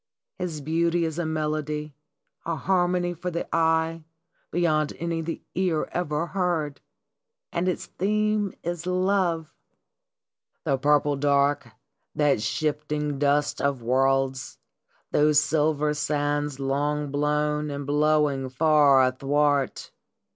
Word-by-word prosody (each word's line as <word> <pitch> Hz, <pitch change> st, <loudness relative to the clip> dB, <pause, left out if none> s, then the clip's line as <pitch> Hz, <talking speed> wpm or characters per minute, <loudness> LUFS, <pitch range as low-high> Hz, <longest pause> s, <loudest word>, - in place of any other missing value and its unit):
His 170 Hz, -5 st, -4 dB
beauty 170 Hz, +3 st, +1 dB
is 160 Hz, +1 st, -3 dB
a 170 Hz, -, -1 dB
melody, 150 Hz, -1 st, -2 dB, 0.5 s
a 165 Hz, -, -2 dB
harmony 175 Hz, 0 st, +1 dB
for 175 Hz, +2 st, -4 dB
the 170 Hz, -1 st, -4 dB
eye 160 Hz, 0 st, +1 dB, 0.5 s
beyond 155 Hz, -3 st, +1 dB
any 170 Hz, -1 st, -2 dB
the 165 Hz, +1 st, -5 dB
ear 180 Hz, -4 st, 0 dB
ever 160 Hz, -2 st, -1 dB
heard! 170 Hz, -6 st, -2 dB, 0.7 s
And 180 Hz, -, -1 dB
its 180 Hz, -, -3 dB
theme 210 Hz, +1 st, 0 dB
is 175 Hz, 0 st, -4 dB
Love! 180 Hz, -3 st, 0 dB, 0.6 s
" -, -, -56 dB
The 135 Hz, -4 st, +1 dB
purple 145 Hz, 0 st, +2 dB
dark, 140 Hz, 0 st, +2 dB, 0.5 s
that 145 Hz, -7 st, +2 dB
shifting 150 Hz, +3 st, -2 dB
dust 145 Hz, 0 st, +1 dB
of 140 Hz, -4 st, -1 dB
worlds, 135 Hz, +1 st, +1 dB, 0.5 s
those 150 Hz, 0 st, +4 dB
silver 150 Hz, -1 st, +1 dB
sands 145 Hz, -1 st, -1 dB
long 145 Hz, +2 st, -1 dB
blown 150 Hz, +1 st, 0 dB
and 140 Hz, 0 st, -5 dB
blowing 145 Hz, -2 st, +2 dB
far 145 Hz, -1 st, +5 dB
athwart 140 Hz, +2 st, 0 dB
150 Hz, 115 wpm, -25 LUFS, 145-165 Hz, 0.7 s, far